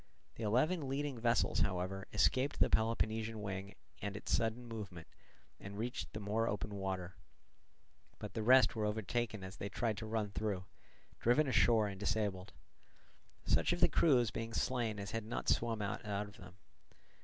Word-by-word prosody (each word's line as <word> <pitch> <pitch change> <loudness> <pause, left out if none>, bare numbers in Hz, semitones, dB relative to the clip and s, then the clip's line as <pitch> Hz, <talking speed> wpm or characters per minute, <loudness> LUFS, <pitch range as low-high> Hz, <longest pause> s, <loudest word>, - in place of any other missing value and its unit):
The - - -10
eleven 135 - +2
leading 140 -2 -2
vessels, 115 0 +2
however, 95 +1 -1
escaped 130 +7 +2
the - - +4
Peloponnesian 110 0 +1
wing 100 -1 -5 0.3
and 100 0 -3
its - - -3
sudden 115 +1 -1
movement, 105 -8 -7 0.5
and 100 +1 -8
reached 120 +4 -3
the 110 - -4
more 110 +2 0
open 105 0 -2
water; 95 -2 -3 1.0
but 105 -2 -7
the 115 - -2
rest 130 +4 +6
were 110 -1 0
overtaken 110 0 -1
as 95 +1 -8
they 100 - -4
tried 110 +1 -1
to 110 - -5
run 110 -2 -1
through, 100 -3 -2 0.5
driven 140 +6 +3
ashore 115 -4 +4
and 100 -1 -6
disabled; 105 -3 -1 0.9
such - - +3
of - - -2
the - - +7
crews 125 -9 +4
being 115 0 -4
slain 115 -5 0
as 100 0 -5
had 115 -1 -2
not 110 +3 -4
swum 115 -3 +1
out 100 +1 -3
of 105 0 -3
them. 90 - -12
110 Hz, 165 wpm, -36 LUFS, 100-115 Hz, 1.0 s, the